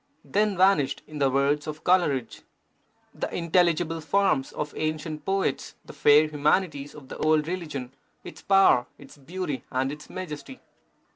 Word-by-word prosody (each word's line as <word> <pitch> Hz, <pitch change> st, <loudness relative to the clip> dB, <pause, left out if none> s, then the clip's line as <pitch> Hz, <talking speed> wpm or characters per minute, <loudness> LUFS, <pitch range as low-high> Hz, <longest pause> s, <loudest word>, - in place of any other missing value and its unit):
Then 210 Hz, -1 st, 0 dB
vanished, 165 Hz, -8 st, +3 dB
in 150 Hz, -1 st, -9 dB
the 135 Hz, -1 st, +3 dB
words 140 Hz, +3 st, +1 dB
of 155 Hz, 0 st, -6 dB
Coleridge, 160 Hz, -9 st, +1 dB, 0.7 s
The -, -, -4 dB
intelligible 170 Hz, -1 st, +1 dB
forms 155 Hz, -6 st, +1 dB
of 150 Hz, -1 st, -5 dB
ancient 155 Hz, 0 st, -3 dB
poets, 195 Hz, -7 st, -1 dB
The -, -, -11 dB
fair 150 Hz, +1 st, +5 dB
humanities 150 Hz, 0 st, 0 dB
of 145 Hz, -3 st, -12 dB
the -, -, -8 dB
old 155 Hz, -1 st, +2 dB
religion, 150 Hz, -8 st, -5 dB, 0.3 s
Its -, -, -11 dB
power, 195 Hz, -11 st, +4 dB
its -, -, -14 dB
beauty, 150 Hz, -2 st, -5 dB
and 130 Hz, +1 st, 0 dB
its 150 Hz, +1 st, -10 dB
majesty. 185 Hz, -, -7 dB
155 Hz, 145 wpm, -26 LUFS, 145-180 Hz, 0.7 s, fair